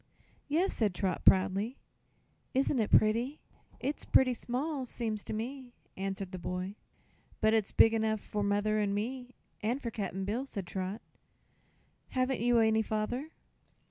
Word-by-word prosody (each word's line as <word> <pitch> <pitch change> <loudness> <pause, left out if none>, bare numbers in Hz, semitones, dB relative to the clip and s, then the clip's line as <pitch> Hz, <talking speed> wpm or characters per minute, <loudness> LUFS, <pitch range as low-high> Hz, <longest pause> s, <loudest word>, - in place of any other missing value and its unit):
"Yes," 335 +7 +1
said 210 -5 0
Trot, 185 -1 -1
proudly. 195 +6 +4 0.8
"Isn't 265 0 +2
it 215 - +1
pretty?" 235 +7 +3 0.4
"It's 280 +4 -2
pretty 255 -1 +4
small, 260 +3 -3
seems 220 -3 -3
to - - -5
me," 245 +3 -5 0.2
answered 195 -1 -3
the 185 - -5
boy. 180 +3 -3 0.7
"But 220 0 +4
it's 220 -3 +2
big 225 - +6
enough 220 -1 +1
for 210 +1 -4
mother 205 +1 +1
and 200 -1 +1
me, 250 +4 -4 0.3
an' 230 +4 0
for 240 -5 -5
Cap'n 195 -3 -3
Bill," 235 +7 -2
said 200 -7 -5
Trot. 190 +4 -4 1.1
"Haven't 255 0 0
you 240 0 +4
any 220 -1 +4
father?" 220 +7 -2
220 Hz, 145 wpm, -32 LUFS, 205-250 Hz, 1.1 s, big